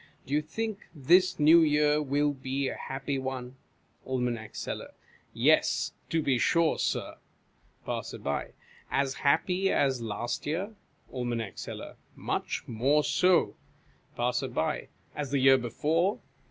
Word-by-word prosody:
Do 135 - -5
you 150 - +3
think 210 +7 -5
this 175 +7 +4
New 160 +3 +7
Year 150 -1 +3
will 145 +1 +1
be 135 0 -2
a - - -5
happy 135 +1 -4
one? 130 -1 -5 0.5
Aim. 125 -3 -1
Seller. - - -6 0.4
Yes, - - +2 0.2
to 160 -1 0
be 130 -4 +2
sure, 165 +5 +2
Sir. - - -2 0.7
Passer. - - -4 0.7
As 135 -1 0
happy 180 +7 +1
as 135 -3 +1
last 115 +4 -3
year? 185 +8 -2 0.4
Aim. 120 -2 -2
Seller. - - -8 0.2
Much - - -3
more 135 +7 +2
so. 180 +5 +3 0.6
Passer. 125 +1 -1 0.3
As 145 -2 -3
the 140 - +1
year 135 0 +6
before 160 - 0
140 Hz, 125 wpm, -29 LUFS, 130-160 Hz, 0.7 s, New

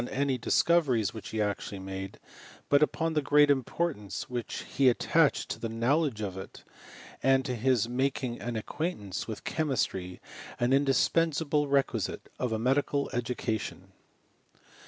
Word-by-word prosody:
any 140 0 0
discoveries 125 - +2
which 110 - -8
he 110 - -3
actually 105 -1 -2
made, 95 0 -6 0.5
but 145 0 +5
upon 165 +1 +1
the 150 - +2
great 145 +1 +5
importance 135 - -2
which 120 -2 -4
he 135 -2 +3
attached 120 - +2
to - - -5
the 115 - -3
knowledge 120 +2 +1
of 95 -3 -3
it, 95 +1 -9 0.6
and 135 0 +3
to 125 -3 -2
his 120 -1 +2
making 130 -1 -1
an 120 0 -3
acquaintance 110 - -4
with 110 -2 -6
chemistry 105 - -1 0.4
an 120 +2 +2
indispensable 145 +2 +2
requisite 135 -7 0
of 125 - -1
a 110 - 0
medical 140 +4 +1
education. 120 -3 -3
125 Hz, 135 wpm, -29 LUFS, 110-145 Hz, 0.6 s, but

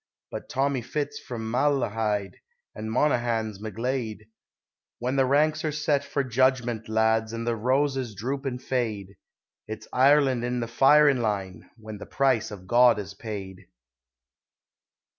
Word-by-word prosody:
But - - -7
Tommy 135 -1 0
Fitz 145 +5 -4
from 110 -2 -6
Malahide, 115 -7 0 0.4
and 110 0 -6
Monaghan's 115 -5 0
McGlade, 115 0 -3 0.8
When 125 +2 -2
the 135 -1 +3
ranks 150 +3 +2
are 155 - 0
set 150 -1 0
for 140 0 -1
judgment, 125 -3 +1
lads, 110 0 +1
and 115 0 -4
the 120 -1 0
roses 130 0 0
droop 135 +7 -3
and 125 -1 -3
fade, 110 -7 -3 0.5
It's 110 0 -7
"Ireland 135 -2 +4
in 125 0 -1
the 115 - -2
firin' 135 +2 +5
line!" 100 -4 -3
when 110 -2 -9
the - - -9
price 135 -5 +1
of 100 -4 -10
God 120 +3 +5
is 100 -1 -6
paid. 95 -3 -8
120 Hz, 140 wpm, -26 LUFS, 110-135 Hz, 0.8 s, firin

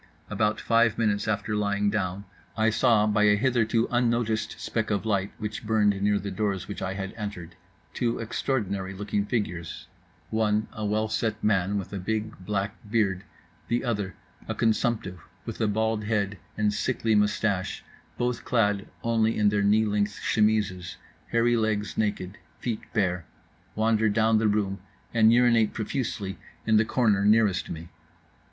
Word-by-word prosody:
About 105 0 +1
five 115 -1 +3
minutes 105 -2 +1
after 110 0 -1
lying 100 0 +1
down, 100 -1 -2 0.3
I 110 0 +3
saw 110 -1 +4
(by 105 0 +3
a 105 0 +5
hitherto 115 -1 +2
unnoticed 115 -2 0
speck 110 -1 -2
of 100 0 -1
light 100 -2 0
which 105 0 -5
burned 105 -2 +2
near 105 0 +3
the 100 0 -4
doors 95 -2 -2
which 100 - -6
I 95 +1 -2
had 95 -1 -5
entered) 100 -6 -6 0.4
two 120 -2 0
extraordinary 100 -5 -2
looking 105 +1 -2
figures—one 105 +2 -3
a 110 - -5
well 110 +1 +1
set 110 0 -2
man 100 -1 +2
with 100 0 -5
a 100 - -3
big, 110 +3 -2
black 100 +2 -2
beard, 100 -4 +1 0.4
the 120 +1 0
other 105 -7 -2 0.3
a - - -3
consumptive 110 -4 0 0.3
with 115 0 -5
a 110 - +3
bald 110 0 0
head 100 -3 -1 0.2
and 105 -1 +2
sickly 115 +1 0
moustache, 105 -2 +1 0.3
both 120 0 -1
clad 105 -4 +1 0.2
only 115 -1 +2
in 105 -1 +4
their 105 0 +1
knee 105 +2 +4
length 105 -1 -1
chemises, 105 -5 +1 0.3
hairy 120 +1 +3
legs 110 -2 0
naked, 100 -3 -2 0.2
feet 115 -3 -4
bare—wander 105 +3 -1
down 110 +1 +3
the 110 - +2
room 100 -2 0 0.3
and 110 -1 +5
urinate 115 -2 +4
profusely 105 -4 -3 0.3
in 110 -1 +4
the 110 - +4
corner 110 -5 +2
nearest 105 -3 +3
me. 85 +1 -7
105 Hz, 150 wpm, -27 LUFS, 100-110 Hz, 0.4 s, a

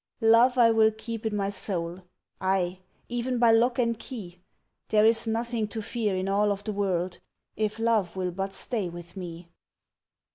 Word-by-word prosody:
Love 235 +3 +5
I 230 -2 +6
will 220 -1 +5
keep 220 0 -5
in 215 - -2
my 200 -1 -1
soul 180 -3 -1 0.4
Ay! 185 -1 0 0.3
even 245 +1 -2
by 235 -1 +5
lock 235 +2 +3
and 230 -3 +1
key! 185 -9 -8 0.5
There 215 0 +4
is 225 +1 +3
nothing 230 0 -1
to 220 +1 -5
fear 215 -3 -1
in 185 +1 -2
all 205 +1 +2
of 200 0 -3
the 215 - -3
world 185 -3 -1 0.4
If 215 0 -1
Love 225 -6 +1
will 185 -1 -2
but 195 +2 -3
stay 200 -1 -3
with 175 +1 -10
me. 170 -2 -8
210 Hz, 175 wpm, -27 LUFS, 185-230 Hz, 0.5 s, I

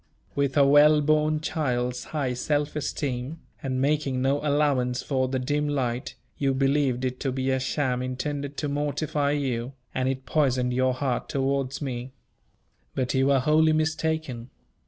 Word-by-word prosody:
With 140 -1 0
a 140 - +6
well 145 +2 +6
born 155 +1 +2
child's 125 -6 -1
high 140 -5 -2
self 145 +4 -1
esteem, 140 0 -3 0.2
and 130 -2 -2
making 140 -1 +1
no 135 +2 +1
allowance 140 -4 +1
for 130 -2 0
the 130 +1 -1
dim 145 +3 0
light, 130 -4 -2 0.2
you 135 -2 +1
believed 135 -2 +1
it 125 0 -3
to 135 - -1
be 130 +1 -1
a 130 - +1
sham 130 -1 -1
intended 140 +3 -4
to 150 - -1
mortify 145 0 -1
you; 130 -3 -2 0.2
and 130 0 0
it 130 0 -3
poisoned 130 -5 +1
your 130 0 +2
heart 130 -2 -2
towards 135 0 -1
me. 125 -1 -5 0.8
But 130 -2 -1
you 135 0 +3
were 140 -2 +4
wholly 155 +3 +4
mistaken. 155 -5 -1
135 Hz, 155 wpm, -26 LUFS, 130-150 Hz, 0.8 s, a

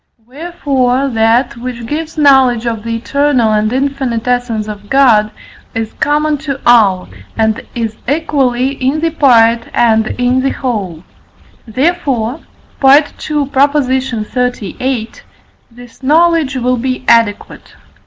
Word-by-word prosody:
Wherefore, 275 -2 -1
that, 230 +2 +1
which 240 -1 -6
gives 315 +5 -5
knowledge 265 -5 +4
of 230 -2 -3
the 230 0 -3
eternal 255 -2 +1
and 215 0 0
infinite 265 -3 -2
essence 245 -3 -1
of 205 -1 -9
God, 235 -6 +4 0.5
is 225 -1 -4
common 295 0 0
to 280 -2 -5
all, 205 -6 +4 0.3
and 220 0 0
is 225 -2 -3
equally 270 -4 0
in 275 +2 -2
the 330 0 0
part 235 -6 +3
and 220 -2 +2
in 250 +1 +1
the 270 - 0
whole; 200 - -4 0.6
therefore 265 -1 -1 0.4
(II. 285 +1 +2
xxxviii.) 255 -4 -1 0.6
this 245 +1 -16
knowledge 315 0 +2
will 250 0 0
be 255 +1 -3
adequate. 230 -3 0
250 Hz, 115 wpm, -13 LUFS, 230-280 Hz, 0.6 s, knowledge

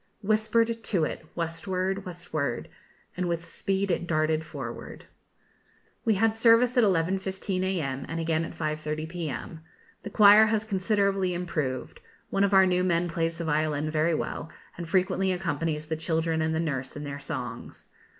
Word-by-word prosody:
Whispered 225 +2 +1
to 185 -8 +1
it, 155 - -4
westward, 185 +3 -2
westward, 155 -8 -3 0.5
And 180 -1 -1
with 170 -1 -2
speed 195 +2 -1
it 175 0 -1
darted 155 0 +1
forward. 155 - -8 1.0
We 220 -2 +3
had 220 +3 +2
service 230 +2 +5
at 245 - +5
11.15 190 +1 0
a.m., 150 -8 -2
and 165 +1 -3
again 165 0 0
at 165 - -6
5.30 155 0 -3
p.m. 160 -3 -5 0.4
The 205 - -6
choir 210 +1 +7
has 215 -1 +1
considerably 195 -2 +1
improved; 155 -7 -3 0.3
one 195 - +2
of 200 - +2
our 190 -1 +7
new 180 0 +2
men 175 -1 +1
plays 165 0 -1
the 170 - -4
violin 155 0 0
very 155 +2 +2
well, 160 - -4 0.3
and 170 -1 -7
frequently 190 +1 +2
accompanies 165 -4 -2
the 160 +1 -2
children 160 0 0
and 160 0 0
the - - 0
nurse 135 -5 -3
in 145 - -6
their 140 -1 -5
songs. 140 - -7
170 Hz, 160 wpm, -27 LUFS, 155-195 Hz, 1.0 s, choir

